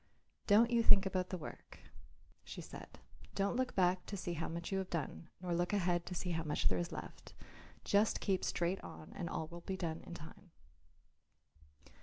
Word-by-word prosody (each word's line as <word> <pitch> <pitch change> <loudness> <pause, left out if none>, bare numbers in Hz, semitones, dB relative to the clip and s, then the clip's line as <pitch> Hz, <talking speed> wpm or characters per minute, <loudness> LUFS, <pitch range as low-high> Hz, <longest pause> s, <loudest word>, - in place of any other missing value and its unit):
"Don't 225 +3 +6
you 235 -1 +5
think 200 -3 +7
about 185 -1 0
the 185 - -2
work," 155 - -9 0.7
she - - -7
said, - - -9 0.4
"don't 200 +3 +1
look 255 0 0
back 180 -1 +3
to 200 - -3
see 175 -2 -2
how 165 0 -2
much 170 +2 -4
you 195 - +2
have 190 - -3
done, 165 0 -3
nor 180 -1 -2
look 175 +3 +1
ahead 175 -3 +2
to 180 - -4
see 180 +1 -1
how 165 -1 0
much 150 -2 -1
there 90 - +1
is 85 - -2
left. - - -8 0.5
Just 205 +2 +3
keep 190 -3 +1
straight 175 +2 0
on 155 - -9
and 170 -3 -3
all 160 - -2
will 170 0 -8
be 190 +2 -3
done 165 -3 -2
in - - -6
time." 160 +4 -11
180 Hz, 195 wpm, -37 LUFS, 170-195 Hz, 0.7 s, think